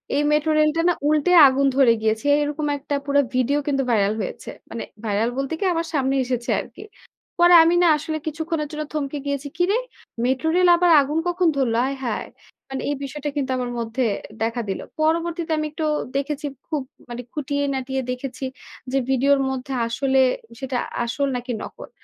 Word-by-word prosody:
এই 290 - +2
মেট্রো 300 +1 +2
রেলটা 305 +2 +3
না - - +4
উল্টে 305 +3 +2 0.2
আগুন 275 +1 +2
ধরে 265 -4 +6
গিয়েছে। 220 +5 0
এরকম 295 +1 -2
একটা 285 +1 -3
পুরা 285 0 +3
ভিডিও 255 +3 +2
কিন্তু 275 -2 +1
ভাইরাল 205 -1 +2
হয়েছে। 185 - -6 0.2
মানে 230 - -5 0.2
ভাইরাল 215 +3 +1
বলতে 275 +3 -2
কি - - -2
আমার 330 0 -2
সামনে 270 -2 +1
এসেছে 245 -1 -3
আরকি। - - -9 0.6
পরে 350 0 +7
আমি 335 +1 +3
না 345 - +5
আসলে 310 +1 -4
কিছুক্ষণের 315 0 -2
জন্য 305 0 -3
থমকে 295 -1 -2
গিয়েছি, 280 0 -2
"কিরে! 365 +4 +2 0.5
মেট্রোরেল 320 +8 +2
আবার 350 0 +3
আগুন 290 +3 -2
কখন 350 0 +1
ধরলো? 235 -4 +1
আয় 275 - -3
হায়।" - - -2 0.4
মানে 270 0 -4
এই 290 - 0
বিষয়টা 295 +2 -4
কিন্তু 275 -2 -1
আমার 245 -1 -3
মধ্যে 230 +3 -2 0.4
দেখা 230 +1 -1
দিল। 190 - -2 0.2
পরবর্তীতে 330 +1 0
আমি 305 - -1
একটু 315 0 -3 0.3
দেখেছি 290 +1 -3 0.2
খুব 305 -4 -2 0.3
মানে 240 0 -5
খুঁটিয়ে-নাটিয়ে 275 -2 -2
দেখেছি 255 +1 -6 0.5
যে 270 - +1
ভিডিওর 275 +2 +3
মধ্যে 265 +1 -4
আসলে, 265 +3 +1 0.4
সেটা 265 -1 -3 0.3
আসল 280 +4 -1
নাকি 245 +1 -4
নকল। - - -10
280 Hz, 170 wpm, -22 LUFS, 255-305 Hz, 0.6 s, পরে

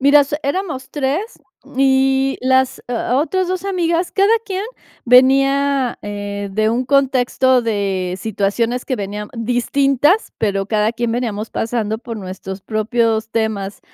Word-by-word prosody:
Mira, 280 +2 +6
s 285 +1 -1
eramos 285 -3 -3
tres 295 - -2 0.2
m - - -17
y 270 0 +2
l 255 - -2
las 260 0 +3
o 245 +1 -1
otras 370 +5 0
d - - -2
dos 370 0 -4
amigas, 350 -2 0
cada 400 +2 +3
quién 385 -1 -3 0.4
venía, 270 +1 +4
eh, 205 0 -5
de 215 +2 +1
un 240 +3 0
contexto 260 -1 +2
de 195 -5 -1
situaciones 220 +4 -1
que 260 - -2
venían 205 0 -5
d 230 0 -3
distintas 275 - +2
pero 195 -2 0
cada 215 +1 +1
quién 235 0 -2
veníamos 225 -3 -3
pasando 220 -2 -2
por 230 -1 -7
nuestros 190 -1 -7
propios 220 +1 0
temas. 215 -3 -2
245 Hz, 150 wpm, -18 LUFS, 215-275 Hz, 0.4 s, Mira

